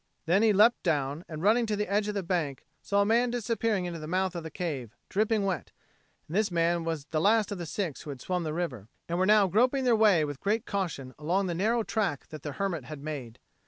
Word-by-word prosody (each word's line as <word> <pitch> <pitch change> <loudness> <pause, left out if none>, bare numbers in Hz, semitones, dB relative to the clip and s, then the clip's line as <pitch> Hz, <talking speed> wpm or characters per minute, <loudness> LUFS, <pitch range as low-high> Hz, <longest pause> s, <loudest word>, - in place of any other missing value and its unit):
Then 175 +5 +3
he 225 -1 +5
leapt 215 +4 +5
down, 145 +1 -1
and, 155 0 -6
running 225 +3 +4
to 215 - 0
the 210 0 -1
edge 205 +2 +1
of 210 - -3
the 200 - -1
bank, 165 -7 -2 0.2
saw 200 0 +2
a - - -1
man 235 +3 +3
disappearing 230 -4 0
into 170 -2 -4
the 155 - -7
mouth 185 +2 0
of 170 - -3
the 160 - -7
cave, 140 - -4
dripping 215 0 +1
wet; 190 -2 -2 0.6
and 160 - -6
this 215 0 +2
man 170 -1 +1
was 160 -3 -3
the 155 -1 +1
last 210 +2 +3
of 200 - -4
the 170 - -5
six 170 -4 -3
who - - -9
had 135 -2 -6
swum 180 +6 -2
the 155 - -2
river, 145 - -3 0.2
and 170 +1 -1
were 185 - +3
now 210 -1 +6
groping 250 +8 +2
their 245 -2 +4
way 205 -8 +4
with 145 -2 -6
great 215 +4 0
caution 165 -10 -3
along 180 +6 +1
the 175 - -1
narrow 220 +7 +1
track 195 -11 -2
that 155 -2 -8
the 145 -1 -5
hermit 170 -6 -2
had 150 -1 -8
made. 135 -7 -6
180 Hz, 245 wpm, -29 LUFS, 155-210 Hz, 0.6 s, now